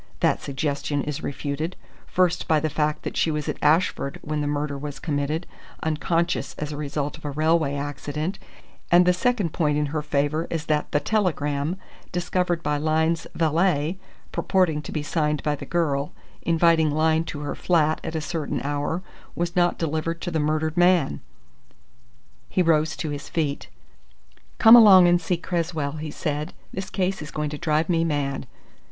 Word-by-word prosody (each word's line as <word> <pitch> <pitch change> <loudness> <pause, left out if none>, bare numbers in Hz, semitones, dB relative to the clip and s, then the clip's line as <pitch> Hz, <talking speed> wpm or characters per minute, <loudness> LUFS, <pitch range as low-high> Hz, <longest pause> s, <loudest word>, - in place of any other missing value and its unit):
That - - +2
suggestion 140 +1 -2
is 150 +1 -4
refuted, 145 +4 -3 0.3
first 180 -1 +1
by 155 -1 +4
the 155 0 -2
fact 150 +1 -1
that - - -4
she - - +2
was 150 -1 -2
at - - -4
Ashford 150 -2 +2
when 150 0 -2
the 145 - -1
murder 145 0 -2
was 145 0 -6
committed, 150 +2 -2 0.4
unconscious 165 0 0
as 150 0 -4
a - - -4
result 145 0 -3
of - - -14
a - - -2
railway 155 0 +1
accident; 145 +5 -4 0.5
and 175 +1 +7
the 180 - +5
second 200 -3 0
point 150 -3 +1
in 150 - +1
her 155 - 0
favour 150 +2 0
is 165 -1 -3
that 150 -1 0
the 145 - +2
telegram 155 -4 0 0.3
discovered 175 -1 -1
by 150 0 0
Lyne's 160 +2 +1
valet, 165 +1 +1 0.3
purporting 175 -6 +1
to - - -8
be 150 - -2
signed 150 -1 0
by 150 -1 +1
the - - -9
girl, 150 -5 0 0.3
inviting 165 -1 +3
Lyne 160 +2 +2
to 145 -2 -6
her 145 -1 -3
flat 160 -3 +1
at 160 - -5
a 160 - -1
certain 155 0 -3
hour, 145 +5 -2 0.3
was 170 0 -2
not 175 -1 +3
delivered 165 +1 -2
to 175 - -3
the 160 - 0
murdered 155 +1 0
man." 175 - +3 1.3
He 185 - +2
rose 160 -2 +2
to 155 - -3
his 145 -1 -6
feet. 150 -4 -2 0.9
"Come 225 -1 +9
along 195 -6 +9
and 175 0 +4
see 175 +1 0
Cresswell," 165 -4 -2
he 155 0 -5
said. 150 +1 -3 0.2
"This 190 0 -5
case 190 -1 -1
is 150 - -7
going 150 -2 -3
to 150 - -4
drive 155 -1 +1
me 165 -2 +2
mad!" 140 -4 -2
155 Hz, 175 wpm, -24 LUFS, 145-170 Hz, 1.3 s, Come